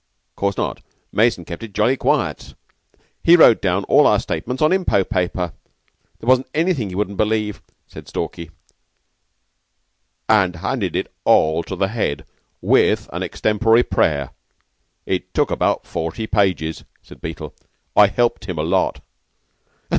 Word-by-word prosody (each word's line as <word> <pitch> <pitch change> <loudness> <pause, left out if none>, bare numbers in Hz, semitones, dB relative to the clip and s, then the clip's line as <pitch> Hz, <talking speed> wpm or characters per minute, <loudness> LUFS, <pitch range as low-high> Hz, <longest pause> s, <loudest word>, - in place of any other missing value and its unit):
"'Course 100 -1 -1
not. - - -3 0.3
Mason 110 -6 +1
kept 85 - -8
it 110 -3 -9
jolly 110 +6 +2
quiet. 135 0 -1 0.7
He 170 - +7
wrote 120 -9 +6
down 95 0 0
all - - +4
our - - +3
statements 125 +11 -4
on 155 - +3
impot 180 - +1
paper. 90 -3 -1 0.7
There 115 - -10
wasn't 130 0 +3
anything 155 - 0
he 90 - -7
wouldn't 100 0 -2
believe," 105 -1 -1 0.2
said - - -12
Stalky. 85 -2 -5 1.8
"And 95 -5 +3
handed 85 - -3
it - - -3
all 80 +1 +3
up 85 - -5
to 95 - -4
the 95 +1 0
Head, 100 -10 -2 0.4
with - - +2
an - - -4
extempore 115 +2 +2
prayer. 70 - 0 0.7
It - - -3
took - - +1
about - - 0
forty 85 +7 -4
pages," 90 -7 0 0.2
said - - -15
Beetle. - - -7 0.4
"I 105 - +7
helped 120 +1 0
him 90 -4 -5
a 75 - -1
lot." 90 +3 0
100 Hz, 145 wpm, -20 LUFS, 90-115 Hz, 1.8 s, He